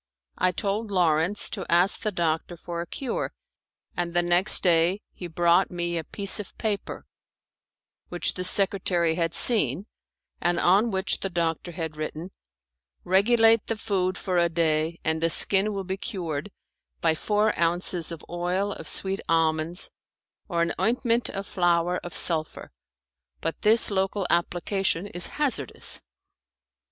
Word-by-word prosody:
I 185 - +3
told 205 +3 -2
Lawrence 180 +1 +1
to 195 - -4
ask 175 +4 +4
the 215 - -1
doctor 170 -1 -2
for 170 0 -5
a 170 - -6
cure, 260 +5 -4 0.6
and 175 -1 -3
the 175 - +3
next 175 +3 +3
day 175 +3 +3
he 180 - -7
brought 175 +2 +2
me 175 -1 -3
a 165 - -2
piece 200 +6 +3
of 205 - -9
paper 210 -3 -3 1.0
which 175 - 0
the 180 - -4
secretary 185 -3 +2
had 165 -1 -1
seen, 190 - +3 0.6
and 175 0 +1
on 200 +6 +4
which 190 -1 -1
the 195 - -2
doctor 170 -1 -2
had 160 -3 -5
written, 155 +4 -5 0.7
"Regulate 225 +4 +4
the 225 - -2
food 185 -3 -1
for 180 -2 -1
a 170 0 +2
day, 160 0 0
and 160 0 0
the 165 - +2
skin 195 +4 +3
will 195 -1 -4
be 190 +1 -4
cured 175 - -4 0.5
by 165 -1 +2
four 210 +6 +1
ounces 170 0 +1
of 165 -2 -8
oil 180 +4 -2
of 160 - -8
sweet 195 +4 -3
almonds 165 +1 0 0.6
or 170 -1 +1
an 170 - -1
ointment 235 0 +1
of 195 0 -5
flour 175 -2 +1
of 175 - -8
sulphur, 160 -2 +1 0.7
but 165 - -4
this 220 +1 +3
local 195 0 0
application 175 +1 0
is 175 -3 -4
hazardous." 250 - -1
175 Hz, 145 wpm, -25 LUFS, 170-200 Hz, 1.0 s, ask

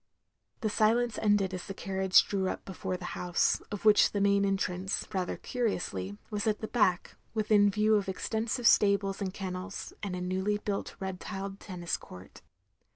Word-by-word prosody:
The 215 - 0
silence 225 +1 +2
ended 205 -3 +2
as 180 - -5
the 195 - -6
carriage 190 -1 +3
drew 190 -2 0
up - - -5
before 185 -1 -4
the 180 - -8
house; 175 -1 +1
of 205 0 -5
which 210 -1 +6
the 205 - 0
main 200 0 +3
entrance, 190 -1 -1
rather 185 -2 -2
curiously, 100 - -2
was 210 0 -2
at 215 -1 +2
the 220 - -4
back, 185 -7 +1 0.2
within 210 -1 +4
view 210 +2 +2
of 205 -2 +2
extensive 225 +5 -2
stables 200 -2 +4
and 190 -2 -1
kennels, 190 0 -6
and 195 -3 -3
a 180 - -4
newly 190 +3 0
built 205 -1 -4
red 190 -1 -4
tiled 195 -1 -6
tennis 175 -4 -3
court. 90 0 -13
195 Hz, 170 wpm, -30 LUFS, 185-210 Hz, 0.2 s, which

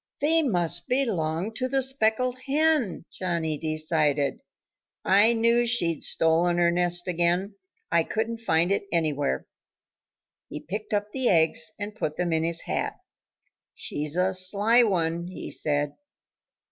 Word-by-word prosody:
"They 325 +3 +3
must 175 - 0
belong 195 - -1
to 255 - -1
the 270 0 0
speckled 255 -1 0
hen," 290 - +1
Johnnie 165 -4 -3
decided. 155 -3 0 0.7
"I 205 +5 +4
knew 235 +1 +2
she'd 170 -10 0
stolen 165 +2 +2
her 170 0 +3
nest 175 0 +2
again. 175 +3 0 0.4
I 170 0 +4
couldn't 225 +5 -3
find 170 -5 +1
it 200 0 -1
anywhere." 145 - -1 1.0
He 150 - -6
picked 210 +7 -7
up 205 0 -1
the 260 0 0
eggs 160 -2 +2
and 205 +1 -5
put 155 -8 -4
them 175 -2 -1
in 160 0 0
his 165 0 +1
hat. - - -3 0.8
"She's 150 +1 -1
a 185 +1 +1
sly 200 +6 +4
one," 170 -5 0
he 185 - -8
said. 145 -1 -1
180 Hz, 135 wpm, -25 LUFS, 165-225 Hz, 1.0 s, I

